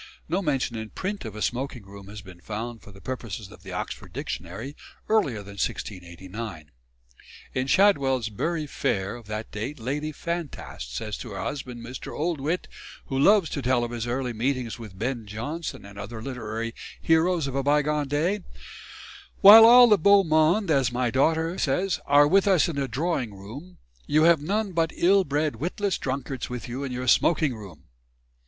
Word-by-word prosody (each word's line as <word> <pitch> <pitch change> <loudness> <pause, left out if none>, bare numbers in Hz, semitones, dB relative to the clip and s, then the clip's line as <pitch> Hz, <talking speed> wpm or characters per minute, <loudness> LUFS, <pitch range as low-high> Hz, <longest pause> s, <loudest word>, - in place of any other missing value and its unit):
No 185 +3 0
mention 135 -8 -1
in 110 -1 -5
print 195 - -4
of 110 -2 -7
a 110 - -3
smoking 125 -1 -3
room 100 0 -12
has 105 +1 -9
been 90 -2 -13
found 110 +4 -5
for 105 - -14
the 100 - -14
purposes 120 - -6
of - - -14
the - - -10
Oxford - - -5
Dictionary 100 - -6 0.3
earlier 145 - +1
than 100 -1 -7
1689. 90 -1 -6 0.8
In 130 +1 -1
Shadwell's 135 - +3
"Bury 160 +9 -2
Fair" 105 -9 -2
of 120 -3 -12
that 105 +1 -5
date 120 +8 -5
Lady 145 +6 -3
Fantast 150 - -6
says 105 +7 -4
to 115 - -7
her 95 - -5
husband, 125 -2 -5
Mr. 130 +2 -7
Oldwit, 160 +1 -1 0.4
who 135 - -1
loves 200 +3 +5
to 140 - -3
tell 125 -1 +2
of 120 - -4
his 120 -1 -4
early 125 0 -2
meetings 125 0 -2
with 105 -5 -10
Ben 115 0 -3
Jonson 140 +8 -5
and 100 0 -11
other 110 +3 -7
literary 115 -2 -5 0.3
heroes 165 0 +2
of 135 - -4
a 135 - 0
bygone 150 +1 +1
day, 160 +9 0 1.0
"While 220 +3 +11
all 245 +1 +9
the 210 -3 +5
Beau 200 +4 +6
Monde, 160 +4 +3
as 135 -4 +2
my 120 -1 0
daughter 160 +6 +1
says, 180 +7 0
are 145 +1 +6
with 195 +5 +3
us 185 -5 +4
in 165 -4 -4
the 140 -1 0
drawing 135 - -2
room, 130 - -10 0.3
you 155 +1 +3
have 165 -2 +5
none 200 +6 -1
but 165 -2 0
ill 195 +3 +4
bred, 145 -4 -1
witless 185 - -2
drunkards 135 -1 -4
with 125 0 -6
you 125 +3 -5
in 135 - -4
your 125 +1 -4
smoking 155 +1 +3
room." 100 -8 -11
135 Hz, 180 wpm, -26 LUFS, 110-160 Hz, 1.0 s, While